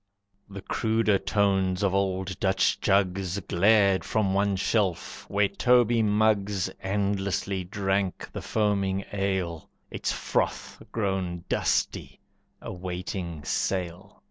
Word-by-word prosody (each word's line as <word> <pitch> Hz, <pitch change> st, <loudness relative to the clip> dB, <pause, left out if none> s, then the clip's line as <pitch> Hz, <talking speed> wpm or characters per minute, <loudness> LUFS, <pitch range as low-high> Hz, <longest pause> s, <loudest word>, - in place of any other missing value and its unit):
The 100 Hz, -1 st, -8 dB
cruder 110 Hz, -3 st, +1 dB
tones 95 Hz, -1 st, +1 dB
of 95 Hz, -2 st, +2 dB
old 95 Hz, -1 st, -1 dB
Dutch 95 Hz, -1 st, +2 dB
jugs 95 Hz, -1 st, +1 dB
Glared 100 Hz, +1 st, +3 dB
from 105 Hz, -4 st, 0 dB
one 100 Hz, 0 st, +2 dB
shelf, 95 Hz, -2 st, -1 dB
where 100 Hz, 0 st, +2 dB
Toby 120 Hz, +2 st, +3 dB
mugs 105 Hz, -3 st, +1 dB
Endlessly 100 Hz, -1 st, -1 dB
drank 95 Hz, 0 st, -1 dB
the -, -, -5 dB
foaming 100 Hz, -3 st, 0 dB
ale, 95 Hz, -5 st, -2 dB, 0.2 s
Its -, -, -2 dB
froth -, -, -2 dB
grown 95 Hz, -5 st, -2 dB
dusty, -, -, -1 dB, 0.4 s
awaiting 90 Hz, -3 st, -5 dB
sale. 95 Hz, +1 st, -3 dB
95 Hz, 105 wpm, -27 LUFS, 95-100 Hz, 0.4 s, Glared